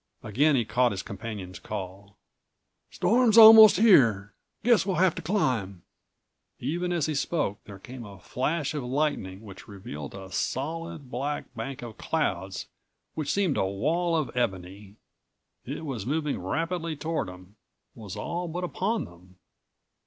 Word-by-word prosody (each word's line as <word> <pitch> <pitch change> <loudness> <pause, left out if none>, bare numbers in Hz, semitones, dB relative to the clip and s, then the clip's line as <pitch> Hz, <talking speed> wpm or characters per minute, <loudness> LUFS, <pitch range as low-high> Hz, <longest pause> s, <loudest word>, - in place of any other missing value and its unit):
Again 140 +8 +2
he 120 -3 +1
caught 120 +3 +2
his 100 0 -5
companion's 100 -4 -7
call.184 100 0 -7 0.8
"Storm's 235 -1 +3
almost 220 -2 +10
here! 115 - +4 0.3
Guess 235 -5 +4
we'll 190 -1 -1
have 185 -1 +3
to - - -6
climb." 115 - -1 0.7
Even 175 +7 -2
as 170 -4 0
he 155 - -2
spoke, 140 - -2
there 100 -2 -10
came 125 +5 -10
a 100 -3 -11
flash 145 - -2
of 145 -3 -3
lightning 125 -8 -2
which 100 -3 -12
revealed 95 -7 -8
a 95 -1 -10
solid 160 - -4
black 140 +2 -4
bank 125 +2 -6
of 115 -4 -9
clouds - - -2 0.5
which 155 -3 -2
seemed 195 -7 +1
a - - +1
wall 165 - 0
of 155 -6 -2
ebony. 95 -3 -3 0.7
It 145 +5 -6
was 120 -7 -5
moving 150 -3 -1
rapidly 165 - -2
toward 155 - -3
them; 90 +3 -13 0.4
was 105 -4 -9
all 170 +12 -4
but 175 +2 -4
upon 205 +5 -1
them. 90 +2 -17
130 Hz, 145 wpm, -27 LUFS, 100-165 Hz, 0.8 s, almost